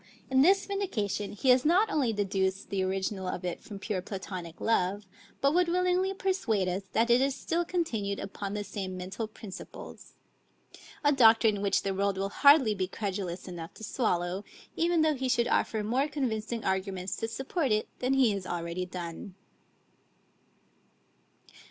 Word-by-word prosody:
In 265 0 +5
this 385 +7 +5
vindication 220 - -2
he 255 +5 0
has 250 0 +6
not 380 +7 +3
only 270 -7 +2
deduced 195 -2 -1
the 195 -1 0
original 190 0 -2
of 180 0 -4
it 175 - -3
from 205 - -9
pure 195 -1 -3
Platonic 185 -3 -7
love, 205 -2 +1 0.4
but 275 +1 +3
would 355 +1 +3
willingly 365 +2 +2
persuade 370 - 0
us 185 +2 -1
that 235 +1 +3
it 240 +2 +5
is 270 0 +1
still 335 +5 -1
continued 225 - -2
upon 200 0 -5
the 210 - -2
same 195 -2 -5
mental 190 +5 -4
principles; 210 -3 -10 0.9
a 290 - +5
doctrine 225 -5 +5
which 200 -1 +1
the 195 - -1
world 200 0 0
will 195 +1 -1
hardly 280 -1 +6
be 190 -2 -2
credulous 195 -3 -4
enough 170 -1 -7
to - - -11
swallow, 185 -5 -1 0.3
even 335 -1 +2
though 310 -1 +3
he 260 -2 -2
should 240 -2 +2
offer 220 -3 +1
more 255 +7 +1
convincing 230 -5 -3
arguments 190 -1 -1
to 225 - -2
support 270 +4 -2
it 215 0 +1
than 255 +1 +1
he 260 -5 +4
has 195 -2 -4
already 175 +1 -3
done. 180 +1 -7
210 Hz, 165 wpm, -29 LUFS, 190-265 Hz, 0.9 s, has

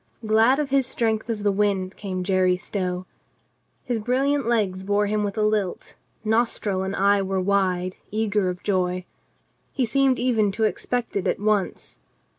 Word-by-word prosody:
Glad 220 +5 +4
of 295 -2 -2
his 270 -2 +3
strength 225 -2 -1
as 215 -3 -2
the 205 - +3
wind 195 -2 0
came 185 -3 -4
Jerry 185 -1 +2
Stow. 180 -1 -3 0.8
His 245 -3 -2
brilliant 265 +3 +1
legs 200 -6 0
bore 205 +1 +1
him 210 +1 0
with 205 +1 -3
a 215 - +2
lilt; 210 -3 -1 0.3
nostril 220 -3 +1
and 190 +1 -3
eye 200 +1 +3
were 190 0 -1
wide, 185 -1 0
eager 210 -3 0
of 180 0 -6
joy. 185 -2 0 0.7
He 260 - +1
seemed 270 +2 +2
even 225 -5 +2
to 220 - -1
expect 240 +2 -1
it 200 - 0
at - - 0
once. 205 -2 -1
205 Hz, 165 wpm, -24 LUFS, 190-225 Hz, 0.8 s, Glad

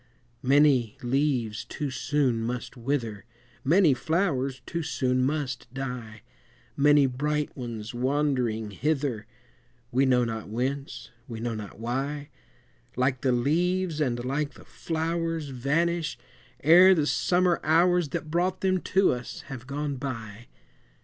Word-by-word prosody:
Many 135 -4 +3
leaves 125 -4 0
too 145 -3 -4
soon 130 -2 0
must 120 +3 -4
wither, 115 -5 -2 0.4
Many 165 +1 +5
flowers 140 -4 -1
too 170 - -3
soon 130 -5 0
must 130 -4 -2
die, 125 -5 -6 0.5
Many 145 0 +5
bright 150 +3 -1
ones 115 -4 -6
wandering 125 -4 0
hither, 135 - -1 0.6
We 130 +2 +3
know 125 -1 +4
not 110 -3 -5
whence, 135 +5 -3 0.2
we 115 -4 -6
know 115 0 -2
not 105 -1 -8
why, 140 +5 -3 0.7
Like 130 0 +1
the 130 - +2
leaves 165 +6 +1
and 120 -4 -1
like 145 +3 -2
the - - -15
flowers, 165 -1 -2
Vanish, 155 +6 0 0.5
ere 180 +5 +8
the 155 -4 +1
summer 175 +3 +2
hours, 175 0 +3
That 155 +2 -4
brought 180 +2 0
them 185 -1 +1
to 190 0 +3
us, 125 -1 -5
have 130 -2 -8
gone 145 0 -3
by. 115 -4 -6
135 Hz, 130 wpm, -27 LUFS, 120-155 Hz, 0.7 s, ere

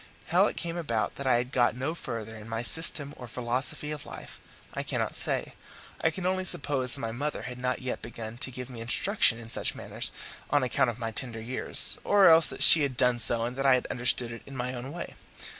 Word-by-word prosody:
How - - +4
it - - -5
came 170 0 -4
about 115 -10 -2
that 140 - -4
I 130 - +4
had 120 +2 -1
got 120 -4 +2
no 130 +5 -3
further 110 -8 -6
in 110 +1 -11
my 115 +1 -3
system 145 +1 +3
or 125 - -9
philosophy 125 +5 -3
of 150 -1 -6
life - - -10 0.3
I - - -3
cannot - - -2
say; - - -1 0.5
I 160 - +4
can 175 +3 -6
only 185 0 0
suppose 135 -7 -1
that - - -6
my 115 -3 -4
mother 145 +5 -4
had 125 -1 -7
not 125 +1 -2
yet 130 - -4
begun 115 0 -8
to 130 - -3
give 125 -1 -7
me 120 -3 -9
instruction 120 - +3
in 115 -1 -11
such - - -3
matters - - -5 0.4
on 145 -1 +2
account 125 0 +1
of 115 - -5
my 115 -2 -4
tender 115 0 -2
years, 120 +3 +2
or 200 -1 +4
else 165 0 +7
that - - -2
she 160 - +9
had 135 -4 -2
done 125 -2 +2
so 115 0 +7
and 125 +1 -5
that 135 - -2
I 130 - +6
had 125 - -2
understood 125 -1 +1
it 115 - -9
in 135 -1 -9
my 125 +1 -3
own 125 +2 -7
way. 170 +2 -7
125 Hz, 235 wpm, -28 LUFS, 120-145 Hz, 0.5 s, she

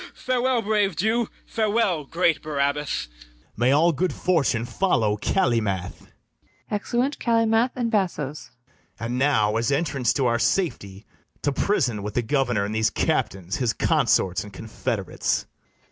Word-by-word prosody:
Farewell, 255 -1 0
brave 205 -3 +1
Jew, 220 +6 +1 0.2
farewell, 210 -8 0
great 165 +1 +1
Barabas! 145 - -1
BARABAS. - - -22 0.5
May 120 +3 +2
all 160 +5 +4
good 180 +4 0
fortune 140 -10 +1
follow 115 - +1
Calymath! 105 - -1 0.6
[Exeunt 240 +6 -1
CALYMATH 230 +1 +2
and 235 -2 -1
BASSOES.] 150 - -2 0.5
And 120 +2 -3
now, 110 -6 +2
as 115 +4 0
entrance 140 -5 +1
to 135 - 0
our 120 -1 +2
safety, 105 - -1 0.4
To 145 - +2
prison 130 - 0
with 105 +1 -6
the 120 - +1
governor 120 -5 +1
and 105 - -4
these 110 0 +2
Captains, 95 -2 -1
his 120 -3 0
consorts 95 -2 +2
and 105 - -11
confederates. 110 +3 -2
140 Hz, 135 wpm, -24 LUFS, -, 0.6 s, all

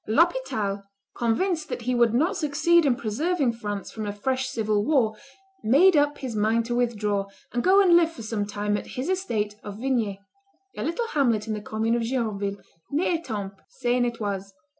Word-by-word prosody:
L'Hospital, 220 - +1 0.3
convinced 315 +8 0
that 240 - -4
he 250 +2 0
would 240 -2 +4
not 320 - +2
succeed 330 0 +3
in 255 - +3
preserving 270 +4 0
France 205 -3 -5
from 215 -2 -5
a - - -1
fresh 255 +5 -1
civil 215 -4 0
war, 230 -5 +2 0.5
made 310 - +5
up 290 0 +3
his 255 -4 -5
mind 220 +2 +2
to 240 - -2
withdraw, 210 -5 0 0.3
and 240 - 0
go 380 +2 +6
and 350 -3 +6
live 335 -1 +4
for 240 -8 -10
some 215 -2 -2
time 205 0 -1
at - - -7
his 260 +7 -2
estate 230 - -1
of 205 -1 -8
Vignay 230 -5 0 0.6
[a - - -5
little 340 +9 -1
hamlet 235 - +1
in 220 - -1
the 210 - -4
commune 220 +2 -1
of 235 - +1
Gironville, 215 -5 -2 0.3
near 320 +5 +1
Etampes, 205 - -6
Seine 245 -1 0
et 235 - -16
Oise]. 195 -2 -4
235 Hz, 185 wpm, -25 LUFS, 210-290 Hz, 0.6 s, go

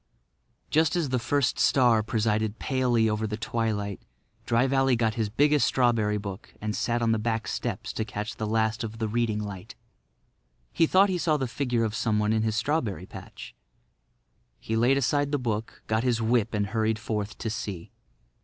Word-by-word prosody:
Just 160 0 +3
as 165 -6 0
the 125 -1 +1
first 130 +3 0
star 120 -5 +4
presided 110 0 0
palely 125 -4 +1
over 110 0 -1
the 105 0 -4
twilight 110 -3 -2 0.5
Dry 120 +2 +3
Valley 135 -1 +3
got 115 -2 +1
his 110 -2 -1
biggest 145 +4 +3
strawberry 115 -5 +2
book 100 -2 -8
and 105 0 -3
sat 120 0 0
on 115 - +2
the 110 - +1
back 110 -1 -1
steps - - -3
to 110 - -2
catch 105 0 -5
the 110 - -2
last 110 +1 0
of 110 0 -6
the 110 -1 -1
reading 115 -1 0
light. 100 -3 -6 1.0
He 165 - +3
thought 195 +4 +5
he 180 -2 -1
saw 155 -2 +2
the 135 - -1
figure 120 -1 -1
of 110 -2 -1
someone 105 -2 +1
in 110 - +1
his 110 -1 0
strawberry 110 - -1
patch. - - -10 1.1
He 110 - -3
laid 120 +4 +3
aside 145 +2 +1
the 145 - +2
book, 115 -4 -4
got 110 +1 0
his 120 -3 +1
whip 115 -1 +1
and 105 -1 +1
hurried 110 0 0
forth 105 -1 -4
to 110 - -3
see. 100 -6 -5
115 Hz, 180 wpm, -27 LUFS, 110-125 Hz, 1.1 s, thought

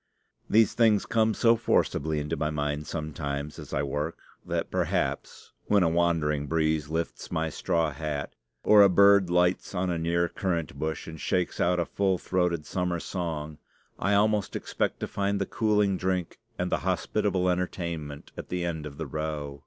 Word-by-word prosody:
These 110 -1 +4
things 115 -3 +3
come 110 -2 +2
so 115 0 +5
forcibly 80 -8 +1
into 75 +3 -2
my 75 -1 -1
mind 75 0 -2
sometimes 75 -2 -4
as - - -10
I 70 - 0
work, 75 +3 -3 0.3
that - - -3
perhaps, - - -2
when 100 -3 +4
a 85 - +3
wandering 80 -4 +1
breeze 80 -2 0
lifts 80 +1 -3
my 80 0 -1
straw 80 0 0
hat 75 -1 -4 0.3
or 105 -1 +7
a 100 - +8
bird 100 0 +6
lights 90 +2 +1
on 90 0 0
a 85 - -1
near 85 +1 +1
currant 85 -6 -2
bush 80 0 -3
and 80 -2 -9
shakes 90 -1 0
out 90 0 +2
a 85 - +1
full 95 0 0
throated 90 -3 0
summer 90 -2 -1
song, 80 -4 -4 0.4
I 100 +1 +2
almost 105 -1 +2
expect - - -2
to - - -2
find 100 0 -1
the 100 - 0
cooling 105 -3 +1
drink 90 -2 -2 0.2
and - - -2
the - - +3
hospitable 90 -1 0
entertainment 85 -5 -3
at - - -8
the 90 -1 -2
end 80 -3 -3
of 70 -1 -11
the - - -4
row. 75 -2 -4
85 Hz, 175 wpm, -27 LUFS, 75-95 Hz, 0.4 s, a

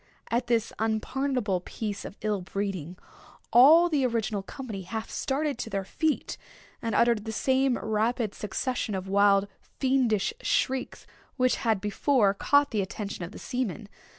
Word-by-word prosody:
At 240 +1 0
this 230 -2 +1
unpardonable 225 -1 0
piece 205 +2 -5
of - - -9
ill 210 -2 -1
breeding, 185 -3 -4 0.6
all 310 +8 +8
the 300 -5 +1
original 225 -4 0
company 220 -1 -7
half 220 +5 -5
started 280 -1 -1
to 225 - -4
their 195 -2 -2
feet, 315 - -1 0.4
and 230 -1 -2
uttered 235 -3 +3
the 220 - -3
same 260 +2 +2
rapid 220 0 0
succession 220 0 -3
of 190 0 -4
wild 200 0 +4
fiendish 260 - 0
shrieks 260 0 -1 0.3
which 255 -1 +2
had 225 -5 +1
before 210 +1 +2
caught 285 +7 +3
the 215 -3 +1
attention 200 0 -5
of 170 - -10
the - - -10
seamen. 235 -5 -3
225 Hz, 150 wpm, -27 LUFS, 200-260 Hz, 0.6 s, all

